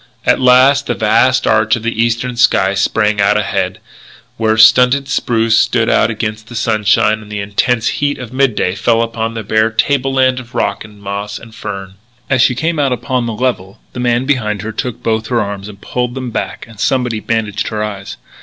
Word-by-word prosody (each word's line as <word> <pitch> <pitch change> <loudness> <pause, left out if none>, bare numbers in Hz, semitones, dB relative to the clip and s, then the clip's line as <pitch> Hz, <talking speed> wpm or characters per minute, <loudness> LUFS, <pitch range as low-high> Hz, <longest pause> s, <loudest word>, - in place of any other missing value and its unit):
At - - +3
last 130 +2 +4
the - - -1
vast 120 +4 +2
arch 110 -1 +3
of 115 - -7
the 115 -1 -1
eastern 120 +1 -1
sky 95 -5 +3
sprang 105 +1 +1
out 105 +1 +3
ahead, 105 - -1 0.6
where 110 -1 0
stunted 125 +5 +5
spruces 115 -4 +1
stood 115 -2 +1
out 110 - +3
against 110 -1 -4
the 120 - -10
sunshine 110 -1 +1
and 105 -1 -13
the 105 - -4
intense 115 +4 0
heat 145 0 -1
of 125 -1 -9
midday 130 -9 +1
fell 115 +3 +1
upon 115 0 -4
a 110 - -4
bare 110 +2 +2
table 135 +4 0
land 130 -1 +2
of 120 -2 -13
rock - - -1
and 105 -1 -15
moss 100 +1 -4
and 115 -1 -13
fern. 95 -3 -7 0.3
As 130 -2 +3
she 125 - +3
came 160 +4 -1
out 140 -2 +1
upon 125 0 -1
the 115 - -3
level, 105 -5 -3
the - - -6
man 120 +1 +1
behind 110 -8 -1
her 110 - -4
took 125 +1 -5
both 110 -1 -1
her 120 -1 0
arms 100 -1 -4
and 100 -2 -12
pulled 125 +3 -3
them 130 -2 -5
back - - -4
and 115 -2 -15
somebody 125 -3 0
bandaged 110 -2 -2
her 105 -1 -3
eyes. 100 -2 -6
115 Hz, 200 wpm, -15 LUFS, 105-125 Hz, 0.6 s, stunted